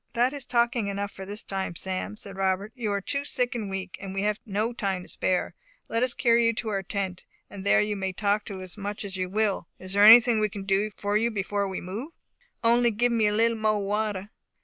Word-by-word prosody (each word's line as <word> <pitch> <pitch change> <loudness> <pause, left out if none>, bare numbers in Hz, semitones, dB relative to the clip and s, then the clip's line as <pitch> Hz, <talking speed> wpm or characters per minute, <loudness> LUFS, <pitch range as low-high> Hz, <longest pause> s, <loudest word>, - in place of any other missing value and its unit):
"That 245 +3 +2
is 280 -3 -6
talking 235 -3 +1
enough 200 0 -3
for 190 0 -9
this 205 +2 -4
time, 190 -3 -3
Sam," 190 +4 -4
said 200 -2 -8
Robert; 190 +2 0
"you 225 -5 -2
are 200 0 -1
too 280 +8 -2
sick 250 -3 -1
and 220 -5 -4
weak, 190 -1 -5
and 195 -1 -6
we 195 - -1
have 210 0 0
no 215 +4 -1
time 195 -5 -2
to - - -14
spare. 185 -1 -1 0.4
Let 230 - 0
us 250 -1 +1
carry 235 -1 +4
you 230 - +2
to 220 0 -3
our 200 -2 -1
tent, 190 -1 -3 0.3
and 200 -2 -8
there 200 - +4
you 210 0 -1
may 190 -1 -2
talk 205 +3 0
as 185 0 -7
much 205 +1 -4
as 195 -1 -4
you 185 -1 -2
will. 205 -3 0
Is 185 +1 -3
there 205 +1 +4
anything 230 +1 +9
we 215 0 +1
can 200 0 -7
do 195 +2 +1
for 205 +1 +1
you 230 +2 +1
before 200 -2 -1
we 190 - -4
move?" 220 - -6 0.5
"Only 235 +1 +4
to 210 - -6
give 245 +1 +3
me 225 -2 +3
a - - +2
little 230 +2 +2
mo'e 215 -1 +2
water." 205 -1 -1
205 Hz, 240 wpm, -27 LUFS, 195-230 Hz, 0.5 s, anything